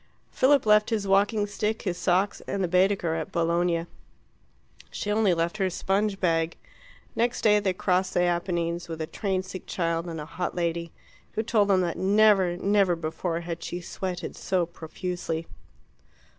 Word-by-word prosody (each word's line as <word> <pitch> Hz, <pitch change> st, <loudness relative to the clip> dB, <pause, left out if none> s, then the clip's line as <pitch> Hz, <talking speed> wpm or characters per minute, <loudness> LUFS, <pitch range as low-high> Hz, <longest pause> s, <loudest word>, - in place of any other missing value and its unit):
Philip 275 Hz, 0 st, +3 dB
left 210 Hz, 0 st, +5 dB
his 215 Hz, -4 st, -1 dB
walking 205 Hz, +2 st, +3 dB
stick, 210 Hz, +1 st, -2 dB
his 185 Hz, -4 st, -1 dB
socks, 185 Hz, +3 st, +1 dB
and 200 Hz, -1 st, -1 dB
the -, -, +1 dB
Baedeker 180 Hz, -1 st, +2 dB
at 160 Hz, -1 st, -4 dB
Bologna; 170 Hz, 0 st, +1 dB, 1.0 s
she 210 Hz, -, -3 dB
only 210 Hz, -2 st, +3 dB
left 170 Hz, +4 st, -1 dB
her 190 Hz, -2 st, +1 dB
sponge 195 Hz, +2 st, 0 dB
bag. 165 Hz, -2 st, +1 dB, 0.6 s
Next 240 Hz, +1 st, 0 dB
day 210 Hz, -1 st, +5 dB
they 195 Hz, -3 st, 0 dB
crossed 185 Hz, 0 st, 0 dB
the 175 Hz, -, +3 dB
Apennines 175 Hz, -1 st, -1 dB
with 165 Hz, -1 st, -5 dB
a 160 Hz, -, -2 dB
train 185 Hz, +3 st, -2 dB
sick 185 Hz, 0 st, -9 dB
child 165 Hz, -1 st, -1 dB
and 165 Hz, -2 st, -5 dB
a 150 Hz, -, -5 dB
hot 175 Hz, +3 st, -4 dB
lady, 170 Hz, -1 st, -2 dB, 0.4 s
who 220 Hz, -, -1 dB
told 215 Hz, -3 st, +2 dB
them 190 Hz, -2 st, +4 dB
that 175 Hz, -2 st, -2 dB
never, 195 Hz, -3 st, +4 dB
never 195 Hz, -2 st, +2 dB
before 165 Hz, +1 st, -3 dB
had 170 Hz, -1 st, -6 dB
she 175 Hz, -, -4 dB
sweated 180 Hz, +1 st, -5 dB
so 185 Hz, -3 st, 0 dB
profusely. 165 Hz, 0 st, -5 dB
180 Hz, 165 wpm, -26 LUFS, 170-200 Hz, 1.0 s, left